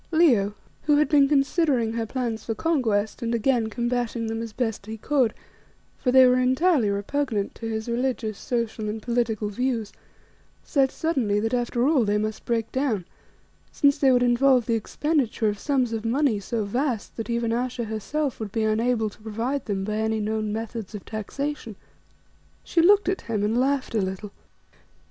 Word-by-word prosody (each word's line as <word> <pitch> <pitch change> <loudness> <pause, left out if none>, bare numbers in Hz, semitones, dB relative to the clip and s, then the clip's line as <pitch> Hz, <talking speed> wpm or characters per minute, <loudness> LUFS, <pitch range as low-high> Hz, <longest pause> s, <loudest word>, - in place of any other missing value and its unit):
Leo 245 - +3 0.3
who 295 -1 +4
had 300 - +3
been 285 -3 +5
considering 275 -5 +2
her 230 -1 -2
plans 235 -3 -3
for 225 - -3
conquest, 225 -11 0
and 235 0 -1
again 230 -1 +1
combating 240 0 -2
them 225 0 -3
as 230 -1 -5
best 225 -3 -3
he 220 +1 -5
could, 255 0 +1 0.7
for 250 - +1
they 260 0 +8
were 250 0 +4
entirely 260 - +3
repugnant 205 +1 -1
to 225 - -7
his 220 0 -3
religious, 235 -2 -1
social 230 -3 -2
and 215 +1 -3
political 230 -3 0
views 230 -1 -2 0.7
said 270 -3 +2
suddenly 255 -12 0
that 225 +3 -1
after 245 +1 +1
all 295 -5 +4
they 205 0 +1
must 215 +1 -3
break 230 -2 -1
down, 255 -9 -1 0.7
since 285 -1 +3
they 270 -2 +5
would 245 -1 +4
involve 245 0 +4
the 230 - 0
expenditure 235 -1 0
of 205 -1 -4
sums 260 -4 0
of 220 -1 -3
money 235 -1 +1
so 215 +2 -2
vast 240 +1 -2
that 225 +1 -5
even 235 -1 0
Ayesha 245 0 -2
herself 230 +6 -3
would 215 -3 -5
be 225 +1 -1
unable 220 +1 +1
to 210 - -11
provide 230 +6 -3
them 195 -3 -2
by 215 +2 -2
any 220 0 0
known 215 0 -1
methods 220 -1 -5
of 205 - -8
taxation. 230 +2 -4 0.9
She 335 - +2
looked 400 +4 +5
at 375 0 0
him 215 -3 -2
and 215 +2 +1
laughed 265 +1 +1
a 220 - +2
little. 190 +2 -4
235 Hz, 175 wpm, -25 LUFS, 220-265 Hz, 0.9 s, they